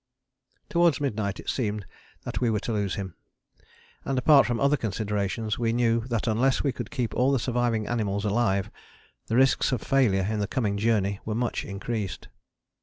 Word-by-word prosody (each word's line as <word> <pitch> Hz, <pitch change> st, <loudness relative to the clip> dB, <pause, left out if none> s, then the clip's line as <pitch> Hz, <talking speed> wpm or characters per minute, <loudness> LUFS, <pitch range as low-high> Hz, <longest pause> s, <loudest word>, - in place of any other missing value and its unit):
" 125 Hz, -1 st, -45 dB
Towards 170 Hz, -5 st, +3 dB
midnight 110 Hz, -8 st, -2 dB
it -, -, -11 dB
seemed 105 Hz, -5 st, -2 dB, 0.4 s
that -, -, -4 dB
we 120 Hz, -, +2 dB
were 110 Hz, -2 st, +1 dB
to 115 Hz, -, -3 dB
lose 100 Hz, -3 st, -1 dB
him, 95 Hz, -3 st, -5 dB, 0.9 s
and, 135 Hz, -, -2 dB
apart 140 Hz, +2 st, +6 dB
from 120 Hz, -2 st, -1 dB
other 140 Hz, +1 st, +3 dB
considerations, 105 Hz, -2 st, -2 dB
we 115 Hz, -1 st, +1 dB
knew 115 Hz, -1 st, +2 dB
that 115 Hz, -4 st, -1 dB
unless 125 Hz, +4 st, +2 dB
we 140 Hz, -, +1 dB
could 120 Hz, -2 st, -6 dB
keep 120 Hz, -4 st, -2 dB
all 130 Hz, +2 st, +2 dB
the 135 Hz, -, +3 dB
surviving 120 Hz, -2 st, 0 dB
animals 105 Hz, -3 st, -1 dB
alive 100 Hz, -2 st, +1 dB, 0.6 s
the 115 Hz, -, -1 dB
risks 135 Hz, +2 st, +3 dB
of 125 Hz, -, 0 dB
failure 105 Hz, -9 st, +2 dB
in 110 Hz, 0 st, -1 dB
the 100 Hz, -, -1 dB
coming 105 Hz, -4 st, -1 dB
journey 100 Hz, -2 st, +1 dB
were 110 Hz, -, -3 dB
much 120 Hz, +1 st, -1 dB
increased. 100 Hz, 0 st, -4 dB
115 Hz, 180 wpm, -26 LUFS, 105-125 Hz, 0.9 s, apart